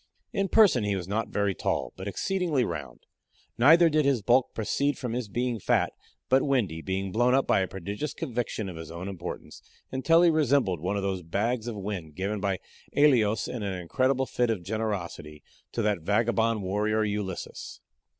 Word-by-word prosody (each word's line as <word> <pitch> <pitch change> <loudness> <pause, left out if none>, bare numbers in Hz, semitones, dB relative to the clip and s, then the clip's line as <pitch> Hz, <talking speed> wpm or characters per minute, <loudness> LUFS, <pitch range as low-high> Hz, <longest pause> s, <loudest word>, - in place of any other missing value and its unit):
In 195 -3 0
person 190 - +5
he 100 -1 0
was 90 -2 -4
not 110 +3 -1
very 100 -1 0
tall, - - -2
but 95 +1 -7
exceedingly 160 - 0
round; - - -6 0.5
neither 165 +7 +7
did 155 -1 +2
his 135 -6 +1
bulk 125 +4 +3
proceed 140 +5 0
from 125 -3 -4
his 125 -2 -2
being 120 +1 -1
fat, - - +1 0.3
but 130 +1 +4
windy, 110 - 0
being 95 +2 -3
blown 120 +5 +3
up 135 - +2
by - - +3
a 95 - 0
prodigious 100 - -5
conviction 120 -7 -3
of 90 -3 -7
his 80 -1 -8
own 85 +3 -6
importance, 95 -4 -7 0.3
until 165 +6 +4
he 170 - +6
resembled 140 - +2
one 95 +6 -1
of 100 - -2
those 95 -2 -1
bags 110 +8 -1
of 120 - -3
wind 95 -7 -5
given 100 +3 -2
by 100 -1 0 0.4
Æolus, 120 -8 +4
in 120 - -5
an 95 -3 -3
incredible 130 +9 +1
fit 125 -2 0
of 105 -6 -1
generosity, 95 -8 -4 0.3
to 115 - -2
that 105 -3 +1
vagabond 110 +3 +1
warrior 105 +3 0
Ulysses. 105 -3 -4
110 Hz, 180 wpm, -27 LUFS, 95-130 Hz, 0.5 s, neither